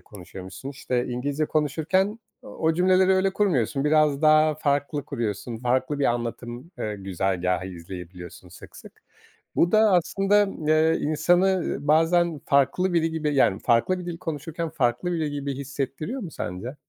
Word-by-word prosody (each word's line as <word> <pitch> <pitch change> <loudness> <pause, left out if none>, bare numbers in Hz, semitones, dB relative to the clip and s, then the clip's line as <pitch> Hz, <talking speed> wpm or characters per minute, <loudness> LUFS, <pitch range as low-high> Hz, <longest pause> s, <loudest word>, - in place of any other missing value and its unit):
konuşuyormuşsun. 95 +1 -10
İşte, 125 -3 -2
İngilizce 140 +5 -2
konuşurken 160 - 0 0.2
o 160 0 -1
cümleleri 185 +2 +4
öyle 190 0 +2
kurmuyorsun. 145 - 0
Biraz 150 -1 +3
daha 155 0 +5
farklı 145 -1 -1
kuruyorsun, 115 -2 -4
farklı 130 +4 0
bir 140 - +1
anlatım, 120 +4 -4
eee, 105 -1 -3
güzergâhı 95 -1 -1
izleyebiliyorsun 90 0 -10
sık 90 - -14
sık. - - -15 0.5
Bu 170 - +3
da 215 - +5
aslında, 195 +4 +3
ımm, 180 -6 -5
eee, 155 +1 +3
insanı, 175 +5 +2
ııı, 180 -6 -1
bazen 165 +1 +3
farklı 140 +7 +2
biri 165 -1 +1
gibi, 155 -2 -1
yani, 100 -7 +3
farklı 120 +11 +2
bir 180 - -7
dil 170 -1 -5
konuşurken 165 +1 -5
farklı 140 +3 0
biri 160 -4 -1
gibi 140 -1 -4
hissettiriyor 140 - -4
mu 175 -7 -7
sence? 95 +10 -6
145 Hz, 150 wpm, -25 LUFS, 120-170 Hz, 0.5 s, daha